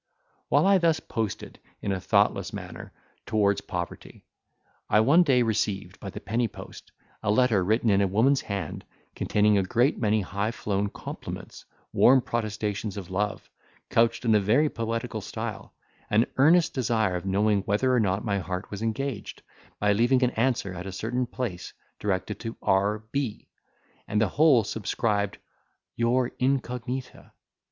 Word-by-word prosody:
While -, -, +4 dB
I 195 Hz, -1 st, +5 dB
thus 165 Hz, -2 st, +2 dB
posted, 110 Hz, -3 st, -4 dB, 0.2 s
in 100 Hz, -, -2 dB
a 95 Hz, -, -1 dB
thoughtless -, -, +2 dB
manner, -, -, -8 dB, 0.4 s
towards 100 Hz, -2 st, +2 dB
poverty, 90 Hz, -3 st, -6 dB, 0.6 s
I 105 Hz, -, +5 dB
one 145 Hz, +10 st, +5 dB
day 135 Hz, -7 st, +4 dB
received, 100 Hz, -4 st, -2 dB
by 100 Hz, -, -6 dB
the -, -, -7 dB
penny 115 Hz, +2 st, -1 dB
post, -, -, -12 dB, 0.3 s
a 110 Hz, -, -2 dB
letter 110 Hz, -3 st, +3 dB
written 110 Hz, +3 st, +2 dB
in 100 Hz, 0 st, +3 dB
a 100 Hz, -, +3 dB
woman's 120 Hz, +8 st, +3 dB
hand, 100 Hz, -6 st, -5 dB, 0.3 s
containing 105 Hz, -1 st, +2 dB
a -, -, +1 dB
great 120 Hz, +9 st, +1 dB
many 110 Hz, -1 st, +2 dB
high 100 Hz, +3 st, -2 dB
flown 100 Hz, -3 st, -2 dB
compliments, -, -, -8 dB, 0.3 s
warm 130 Hz, +2 st, +6 dB
protestations 105 Hz, -4 st, -3 dB
of 95 Hz, -3 st, -7 dB
love, 105 Hz, +2 st, -2 dB, 0.4 s
couched 115 Hz, +1 st, +2 dB
in 115 Hz, -, +4 dB
a 105 Hz, -, +5 dB
very 120 Hz, +10 st, +3 dB
poetical 115 Hz, 0 st, -3 dB
style, -, -, -6 dB, 0.3 s
an 110 Hz, +3 st, +4 dB
earnest 160 Hz, +5 st, +5 dB
desire 110 Hz, -7 st, +1 dB
of 90 Hz, +2 st, -4 dB
knowing 100 Hz, +1 st, +2 dB
whether 125 Hz, +6 st, +1 dB
or 125 Hz, -, +4 dB
not 100 Hz, -1 st, 0 dB
my 100 Hz, -2 st, 0 dB
heart 90 Hz, +1 st, -5 dB
was 100 Hz, 0 st, -6 dB
engaged, 115 Hz, +1 st, -3 dB, 0.4 s
by 105 Hz, 0 st, +3 dB
leaving 120 Hz, +5 st, +3 dB
an 125 Hz, -, +2 dB
answer 115 Hz, -6 st, 0 dB
at 90 Hz, +1 st, -7 dB
a -, -, -5 dB
certain 120 Hz, +6 st, -2 dB
place, 115 Hz, -9 st, -5 dB, 0.3 s
directed 100 Hz, 0 st, -2 dB
to 115 Hz, 0 st, -6 dB
R. 100 Hz, +3 st, +1 dB
B., 135 Hz, -6 st, -3 dB, 0.6 s
and 105 Hz, -, 0 dB
the 110 Hz, -3 st, +2 dB
whole 145 Hz, -, +5 dB
subscribed 105 Hz, 0 st, -1 dB, 0.6 s
"Your 120 Hz, +2 st, +1 dB
incognita." 125 Hz, -1 st, -2 dB
110 Hz, 155 wpm, -26 LUFS, 100-125 Hz, 0.6 s, warm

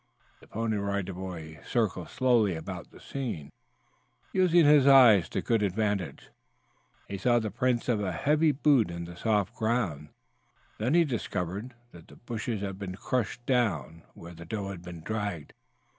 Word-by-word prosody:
The -, -, -18 dB
Pony 110 Hz, -1 st, -2 dB
Rider 100 Hz, -1 st, -2 dB
Boy 85 Hz, -4 st, -7 dB
circled 100 Hz, -8 st, -1 dB
slowly 120 Hz, -7 st, +2 dB
about 80 Hz, -, -7 dB
the -, -, -16 dB
scene, 115 Hz, -, -5 dB, 0.8 s
using 175 Hz, -3 st, +4 dB
his 145 Hz, -2 st, +6 dB
eyes 120 Hz, -, +7 dB
to -, -, -3 dB
good 115 Hz, -2 st, +1 dB
advantage. 100 Hz, -6 st, -2 dB, 0.8 s
He 100 Hz, -, -5 dB
saw 120 Hz, +4 st, +3 dB
the 110 Hz, -3 st, -1 dB
prints 125 Hz, 0 st, 0 dB
of 115 Hz, -4 st, +1 dB
a 95 Hz, -3 st, -1 dB
heavy 150 Hz, -, +2 dB
boot 135 Hz, -, +3 dB
in 85 Hz, 0 st, -5 dB
the 85 Hz, 0 st, -10 dB
soft 105 Hz, 0 st, 0 dB
ground; 105 Hz, -, -1 dB, 0.7 s
then 125 Hz, +8 st, +1 dB
he 170 Hz, -1 st, +5 dB
discovered 110 Hz, -, -4 dB, 0.2 s
that 85 Hz, -2 st, -14 dB
the -, -, -15 dB
bushes 115 Hz, -2 st, -4 dB
had 95 Hz, -1 st, -5 dB
been 95 Hz, -2 st, -5 dB
crushed 120 Hz, +3 st, -2 dB
down 90 Hz, -, 0 dB
where 85 Hz, +1 st, -11 dB
the 85 Hz, 0 st, -10 dB
doe 100 Hz, 0 st, -4 dB
had 95 Hz, -3 st, -7 dB
been 90 Hz, -2 st, -9 dB
dragged. 100 Hz, -6 st, -4 dB
105 Hz, 160 wpm, -28 LUFS, 90-120 Hz, 0.8 s, eyes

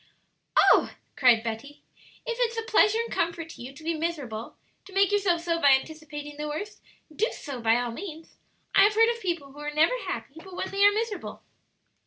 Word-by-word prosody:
"Oh," -, -, +5 dB, 0.2 s
cried 240 Hz, -4 st, +5 dB
Betty, 230 Hz, +6 st, -6 dB, 0.4 s
"if 470 Hz, -, -3 dB
it's 470 Hz, -2 st, 0 dB
a 455 Hz, -, -1 dB
pleasure 440 Hz, -1 st, +4 dB
and -, -, -7 dB
comfort 335 Hz, -1 st, -2 dB
to -, -, -11 dB
you 250 Hz, +2 st, -7 dB
to 285 Hz, +3 st, -14 dB
be 335 Hz, +1 st, 0 dB
miserable 295 Hz, -9 st, -4 dB, 0.3 s
to 390 Hz, -, -14 dB
make 395 Hz, +1 st, +3 dB
yourself 385 Hz, -5 st, +2 dB
so 335 Hz, -1 st, -1 dB
by 280 Hz, -1 st, +7 dB
anticipating 295 Hz, +1 st, -4 dB
the 300 Hz, 0 st, -4 dB
worst 400 Hz, +8 st, -6 dB, 0.3 s
do 440 Hz, +7 st, +2 dB
so 270 Hz, -5 st, -7 dB
by 225 Hz, 0 st, +4 dB
all 245 Hz, -1 st, -2 dB
means. 325 Hz, +4 st, -9 dB, 0.4 s
I -, -, +6 dB
have 415 Hz, +1 st, +5 dB
heard 455 Hz, +1 st, +5 dB
of 465 Hz, -, -12 dB
people 335 Hz, -8 st, -3 dB
who 290 Hz, -, -14 dB
are 295 Hz, 0 st, -4 dB
never 310 Hz, +9 st, +3 dB
happy -, -, -5 dB
but 380 Hz, -1 st, -11 dB
when 375 Hz, -, -4 dB
they 395 Hz, +1 st, +1 dB
are 410 Hz, -, +8 dB
miserable." 435 Hz, 0 st, -4 dB
330 Hz, 205 wpm, -27 LUFS, 285-400 Hz, 0.4 s, are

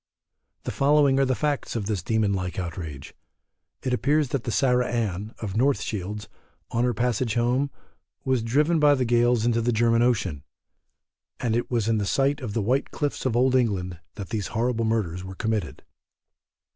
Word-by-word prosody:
The -, -, -3 dB
following 140 Hz, -1 st, +3 dB
are 135 Hz, -, +4 dB
the 130 Hz, -1 st, +1 dB
facts 145 Hz, -3 st, -2 dB
of 110 Hz, -4 st, -2 dB
this 100 Hz, -3 st, -1 dB
demon 110 Hz, -3 st, +1 dB
like 90 Hz, -2 st, -3 dB
outrage: 80 Hz, -6 st, -6 dB, 0.7 s
It 130 Hz, -, -1 dB
appears 140 Hz, +3 st, +2 dB
that 130 Hz, -1 st, -2 dB
the 115 Hz, -, -1 dB
Sarah 125 Hz, 0 st, +2 dB
Ann, 110 Hz, -3 st, -2 dB
of 105 Hz, -3 st, -5 dB
North 135 Hz, +4 st, +3 dB
Shields, 105 Hz, +1 st, -4 dB, 0.4 s
on 115 Hz, -, +1 dB
her 125 Hz, -, +1 dB
passage 120 Hz, -1 st, 0 dB
home, 125 Hz, +4 st, +1 dB, 0.6 s
was 130 Hz, -3 st, +2 dB
driven 150 Hz, +8 st, +2 dB
by 145 Hz, -1 st, +5 dB
the 130 Hz, -2 st, 0 dB
gales 120 Hz, -1 st, +3 dB
into 115 Hz, -1 st, +2 dB
the 120 Hz, +2 st, +1 dB
German 115 Hz, 0 st, +3 dB
ocean, 110 Hz, -, +1 dB, 1.0 s
and 115 Hz, -2 st, 0 dB
it 120 Hz, -, -1 dB
was 115 Hz, -4 st, 0 dB
in 110 Hz, -2 st, +1 dB
sight 140 Hz, +7 st, +1 dB
of 110 Hz, -5 st, -5 dB
the 115 Hz, -, +1 dB
white 130 Hz, +6 st, +1 dB
cliffs 145 Hz, -3 st, -2 dB
of 120 Hz, -, -1 dB
Old 130 Hz, +2 st, +3 dB
England 95 Hz, -9 st, 0 dB, 0.2 s
that 100 Hz, -3 st, -7 dB
these 105 Hz, -4 st, -2 dB
horrible 115 Hz, 0 st, 0 dB
murders 95 Hz, -6 st, -1 dB
were 95 Hz, 0 st, -8 dB
committed. 110 Hz, +1 st, -2 dB
115 Hz, 180 wpm, -25 LUFS, 105-130 Hz, 1.0 s, by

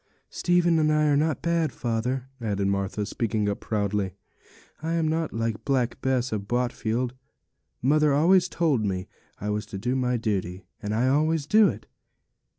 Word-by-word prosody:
'Stephen 175 Hz, -2 st, +2 dB
and 155 Hz, 0 st, +3 dB
I 150 Hz, 0 st, +3 dB
are 145 Hz, -1 st, +3 dB
not 155 Hz, 0 st, 0 dB
bad, 170 Hz, -3 st, +1 dB
father,' 125 Hz, +3 st, -2 dB
added 100 Hz, -3 st, -1 dB
Martha, 100 Hz, +1 st, -1 dB
speaking 110 Hz, 0 st, -1 dB
up 100 Hz, -, -1 dB
proudly; 100 Hz, -3 st, -1 dB, 0.7 s
'I 165 Hz, +1 st, -2 dB
am 165 Hz, -1 st, +1 dB
not 160 Hz, 0 st, -1 dB
like 115 Hz, -1 st, -2 dB
Black 125 Hz, -3 st, 0 dB
Bess 130 Hz, -1 st, 0 dB
of 100 Hz, -2 st, -3 dB
Botfield. 120 Hz, 0 st, -1 dB, 0.7 s
Mother 150 Hz, +3 st, +4 dB
always 175 Hz, +5 st, +4 dB
told 150 Hz, -9 st, +1 dB
me 95 Hz, -2 st, -2 dB, 0.3 s
I 105 Hz, +1 st, -2 dB
was 105 Hz, 0 st, -3 dB
to 100 Hz, -, -6 dB
do 120 Hz, +6 st, -1 dB
my 125 Hz, -1 st, +1 dB
duty; 95 Hz, -5 st, -2 dB, 0.2 s
and 105 Hz, -1 st, -2 dB
I 120 Hz, +3 st, +2 dB
always 155 Hz, +2 st, +2 dB
do 215 Hz, +6 st, +5 dB
it. -, -, -4 dB
125 Hz, 165 wpm, -26 LUFS, 105-155 Hz, 0.7 s, do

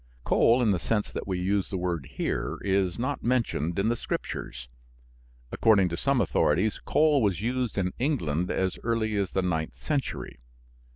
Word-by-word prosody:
Coal, 120 Hz, +2 st, +4 dB
in 110 Hz, -, +3 dB
the 95 Hz, -, +1 dB
sense 105 Hz, +3 st, -1 dB
that -, -, -5 dB
we 95 Hz, -2 st, -1 dB
use 95 Hz, +2 st, 0 dB
the 95 Hz, -, -3 dB
word 85 Hz, -6 st, -2 dB
here, -, -, -2 dB
is 95 Hz, -2 st, +1 dB
not 130 Hz, +4 st, -2 dB
mentioned 115 Hz, -, 0 dB
in 100 Hz, +2 st, +1 dB
the 120 Hz, -, +1 dB
Scriptures. 65 Hz, -, -5 dB, 0.8 s
According 100 Hz, -5 st, +4 dB
to 85 Hz, -, -3 dB
some 135 Hz, +8 st, +1 dB
authorities, 95 Hz, +1 st, +1 dB
coal 150 Hz, -3 st, +3 dB
was 100 Hz, -6 st, +1 dB
used 125 Hz, +1 st, -2 dB
in 90 Hz, -2 st, 0 dB
England 90 Hz, -, 0 dB
as 95 Hz, -1 st, -1 dB
early 110 Hz, -2 st, 0 dB
as 100 Hz, -3 st, -1 dB
the 95 Hz, -, +1 dB
ninth 80 Hz, -3 st, -1 dB
century. 145 Hz, -, -3 dB
100 Hz, 170 wpm, -27 LUFS, 90-120 Hz, 0.8 s, Coal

